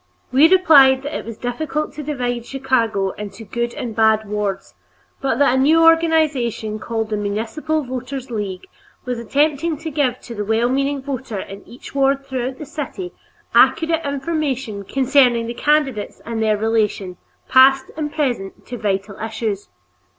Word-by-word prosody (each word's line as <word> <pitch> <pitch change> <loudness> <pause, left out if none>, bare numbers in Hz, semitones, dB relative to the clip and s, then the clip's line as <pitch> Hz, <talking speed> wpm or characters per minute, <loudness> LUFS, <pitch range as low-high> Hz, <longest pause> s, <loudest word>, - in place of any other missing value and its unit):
We 280 +5 +6
replied 280 -8 +6
that 290 - -5
it - - -4
was 230 -1 -7
difficult 300 +5 -3
to 305 - -6
divide 245 -5 -3
Chicago 230 -8 0
into 210 +2 -7
good 235 +3 -3
and 230 -3 -5
bad 220 -1 +3
wards, 200 -2 -3 0.5
but 265 -4 0
that 280 -2 +4
a 260 - +2
new 320 +4 +5
organization 310 -10 +2
called 225 -1 -3
the 210 - 0
Municipal 225 +10 -2
Voters' 255 0 -6
League 200 -4 -4 0.4
was 250 -2 -3
attempting 295 +6 0
to 320 +2 -6
give 265 -4 0
to 240 - -9
the 210 -2 -3
well 225 +3 +1
meaning 275 +1 0
voter 260 -5 -5
in 195 +1 -8
each 245 - -12
ward 275 0 +1
throughout 260 -1 -3
the 300 - -7
city 310 +5 -6 0.4
accurate 325 0 +4
information 275 -7 -2
concerning 260 -2 +3
the 235 - -4
candidates 270 -5 0
and 230 -1 -3
their 215 -1 +2
relation, 210 -4 -1 0.3
past 265 +1 +5
and 300 -1 -3
present, 245 -11 -3
to 245 -2 -7
vital 200 -1 -2
issues. 220 -2 -4
255 Hz, 160 wpm, -20 LUFS, 220-285 Hz, 0.5 s, We